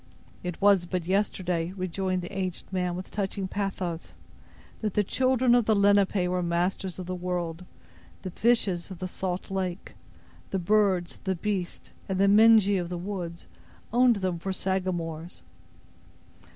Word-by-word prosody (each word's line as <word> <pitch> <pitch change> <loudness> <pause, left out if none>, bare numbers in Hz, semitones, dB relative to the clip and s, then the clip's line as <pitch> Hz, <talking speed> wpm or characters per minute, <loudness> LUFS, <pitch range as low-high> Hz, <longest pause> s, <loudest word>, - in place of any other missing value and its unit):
"It 180 -1 -4
was 200 -3 +4
but 180 -2 -2
yesterday," 180 -3 0
rejoined 185 0 -2
the 175 - -7
aged 185 0 -4
man, 180 -1 0
with 185 +1 -7
touching 195 -1 -2
pathos, 185 -4 -4 0.6
"that 215 -3 -2
the 210 - +3
children 255 +3 +2
of 240 -2 +4
the 220 - +3
Lenape 200 -2 +3
were 180 0 0
masters 175 +2 -1
of 185 - -5
the 185 - -4
world. 180 -1 -3 0.6
The 185 - -4
fishes 205 -6 +1
of 190 - -7
the 185 - -4
salt 185 0 -4
lake, 185 -1 -3 0.6
the 195 - -1
birds, 190 -1 +1
the 190 -1 0
beasts, 190 -1 -3 0.2
and 190 - 0
the 200 - +5
Mengee 210 -1 +6
of 170 - -5
the 180 - -3
woods, 175 -2 -5 0.5
owned 245 0 +5
them 185 -4 -2
for 190 +3 -3
Sagamores." 175 -3 -3
185 Hz, 150 wpm, -27 LUFS, 175-200 Hz, 0.6 s, Mengee